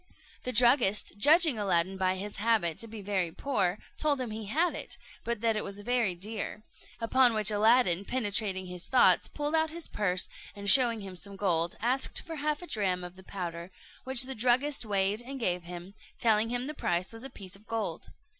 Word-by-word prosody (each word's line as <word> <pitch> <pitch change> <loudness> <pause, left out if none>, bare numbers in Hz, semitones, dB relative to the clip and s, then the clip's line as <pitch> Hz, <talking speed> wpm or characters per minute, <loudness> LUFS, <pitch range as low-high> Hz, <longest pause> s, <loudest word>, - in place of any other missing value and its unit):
The 250 - -2
druggist, 240 -3 +3
judging 305 - +6
Aladdin 190 -2 +1
by 185 -1 0
his 200 +2 -6
habit 205 -7 +1
to 230 - -4
be 215 -2 -9
very 190 -4 -1
poor, 190 -6 -1 0.2
told 295 -3 +1
him 250 -4 -3
he 215 0 -5
had 325 - +1
it, - - -4 0.3
but 235 -2 -2
that 225 -1 +2
it 215 - -2
was 200 - -7
very 235 -4 +1
dear; 210 +3 -5 0.4
upon 240 +1 +3
which 215 -1 +4
Aladdin, 210 -3 +3
penetrating 205 -5 -1
his 180 -1 -6
thoughts, 255 - +4
pulled 295 +1 -4
out 320 0 +2
his 335 +1 -4
purse, 185 -3 0 0.3
and 200 0 -7
showing 235 -1 +5
him 190 -2 -8
some 200 +2 -4
gold, 175 -4 0
asked 255 +4 0
for 325 -1 -8
half 300 +3 -2
a - - -6
dram 185 - -1
of 180 0 -8
the 190 - -13
powder; 170 -2 -6 0.3
which 260 -1 +2
the 265 +1 -4
druggist 255 +4 +1
weighed 200 +1 0
and 265 +2 -7
gave 180 -6 -1
him, 175 +2 -9 0.2
telling 220 -1 +2
him 245 +1 -2
the 300 - -4
price 180 - -2
was 225 - -10
a 270 - -8
piece 195 -5 -10
of 205 +3 -18
gold. 225 -1 -3
215 Hz, 200 wpm, -29 LUFS, 190-250 Hz, 0.4 s, judging